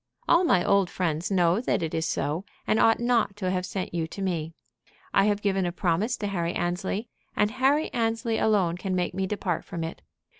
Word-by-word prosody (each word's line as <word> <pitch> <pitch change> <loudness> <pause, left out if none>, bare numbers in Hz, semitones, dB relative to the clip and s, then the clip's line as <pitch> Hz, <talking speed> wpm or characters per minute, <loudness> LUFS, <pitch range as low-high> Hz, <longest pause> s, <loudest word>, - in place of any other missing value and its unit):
"All 340 +2 +5
my 185 - +3
old 200 -2 +3
friends 170 0 -1
know 180 +1 +3
that 245 - 0
it 160 - -3
is 160 -1 0
so, 155 +4 -1 0.2
and 220 - +2
ought 225 - +4
not 235 -4 +1
to 185 -3 -2
have 180 -1 -1
sent 190 -3 -4
you 165 -2 -1
to 195 - -8
me. 165 -3 -2 0.6
I 195 - +5
have 205 -1 +1
given 195 -2 +1
a 175 - -1
promise 190 +7 0
to 205 - -3
Harry 170 -3 -1
Annesley, 180 +5 -2 0.3
and 210 0 +2
Harry 270 +5 +2
Annesley 230 -1 0
alone 190 -6 +2
can 185 0 -2
make 180 -1 -1
me 190 0 -1
depart 185 -4 -2
from 165 - -5
it." 165 - -6
190 Hz, 210 wpm, -26 LUFS, 175-215 Hz, 0.6 s, All